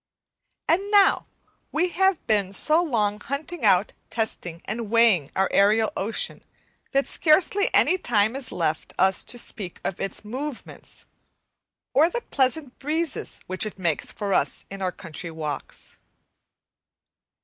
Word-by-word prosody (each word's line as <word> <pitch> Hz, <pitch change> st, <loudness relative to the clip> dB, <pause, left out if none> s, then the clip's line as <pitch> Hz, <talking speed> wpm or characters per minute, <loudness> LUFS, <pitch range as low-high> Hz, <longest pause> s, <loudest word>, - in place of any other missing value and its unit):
And 385 Hz, +5 st, +2 dB
now 405 Hz, -2 st, +4 dB, 0.4 s
we 350 Hz, +4 st, +1 dB
have 380 Hz, 0 st, +1 dB
been 200 Hz, -3 st, +1 dB
so 310 Hz, -, +4 dB
long 210 Hz, -10 st, 0 dB
hunting 290 Hz, +5 st, -4 dB
out, 195 Hz, -2 st, +4 dB, 0.2 s
testing 180 Hz, -7 st, -3 dB
and 220 Hz, 0 st, -4 dB
weighing 220 Hz, -10 st, +4 dB
our 190 Hz, 0 st, +2 dB
aerial 215 Hz, +2 st, +4 dB
ocean, 220 Hz, +3 st, -2 dB, 0.5 s
that 275 Hz, 0 st, +2 dB
scarcely 365 Hz, +5 st, +3 dB
any 370 Hz, -, +3 dB
time 220 Hz, -, +1 dB
is 270 Hz, -4 st, -5 dB
left 165 Hz, -3 st, -2 dB
us 190 Hz, 0 st, +3 dB
to 245 Hz, -, 0 dB
speak 200 Hz, -6 st, -5 dB
of 185 Hz, -, -3 dB
its 195 Hz, +2 st, -4 dB
movements 260 Hz, +4 st, -7 dB, 0.9 s
or 305 Hz, +6 st, +5 dB
the 480 Hz, +5 st, -3 dB
pleasant 270 Hz, -, 0 dB
breezes 315 Hz, +2 st, -2 dB
which 185 Hz, +2 st, 0 dB
it 215 Hz, -2 st, -4 dB
makes 170 Hz, -5 st, 0 dB
for 200 Hz, -2 st, -3 dB
us -, -, 0 dB
in 195 Hz, 0 st, -7 dB
our 185 Hz, -1 st, 0 dB
country 170 Hz, -2 st, -6 dB
walks. 155 Hz, -3 st, -6 dB
225 Hz, 140 wpm, -25 LUFS, 195-305 Hz, 0.9 s, or